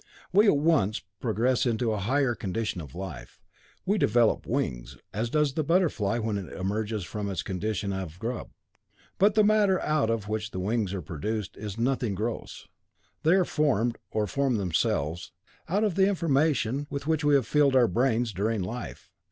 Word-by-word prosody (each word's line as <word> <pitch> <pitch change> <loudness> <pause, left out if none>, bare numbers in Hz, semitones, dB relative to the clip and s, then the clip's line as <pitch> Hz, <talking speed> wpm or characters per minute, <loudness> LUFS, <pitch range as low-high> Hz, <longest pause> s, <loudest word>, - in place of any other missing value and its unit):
We 205 +3 +6
at 150 - +5
once 140 -10 +2 0.2
progress 120 +2 +1
into 115 0 0
a 105 - -1
higher 130 +5 +1
condition 105 -2 -3
of 70 -2 -11
life. 90 -7 -8 0.5
We 205 +2 +1
develop 115 -4 +2
wings, - - -2 0.2
as 115 +3 -1
does 150 0 +1
the 155 - 0
butterfly 145 - +1
when 110 -3 -1
it 95 - -8
emerges 105 +2 -2
from 100 +3 -4
its 95 -4 -3
condition 100 +1 -2
of 90 -4 -5
grub. 115 +4 -4 0.7
But 200 +2 +4
the 215 - +5
matter 205 -3 +4
out 150 -7 +1
of 115 -3 -1
which 105 0 -2
the 95 - -5
wings 105 0 0
are 90 - -5
produced 100 +7 -4
is 105 -1 -6
nothing 120 -3 0
gross. 110 +4 -5 0.5
They 160 - +4
are 190 -2 +3
formed, 120 -8 +1
or 110 -1 0
form 140 +2 0
themselves, 85 -4 -1 0.4
out 200 +5 +1
of 210 -4 +1
the 190 +2 +4
information 145 - +1
with 140 -1 -4
which 160 0 0
we 145 -1 +4
have 135 -4 +3
filled 145 -1 +3
our 125 -2 +6
brains 120 -2 +1
during 105 +2 -1
life. 120 +6 -7
115 Hz, 175 wpm, -27 LUFS, 100-145 Hz, 0.7 s, We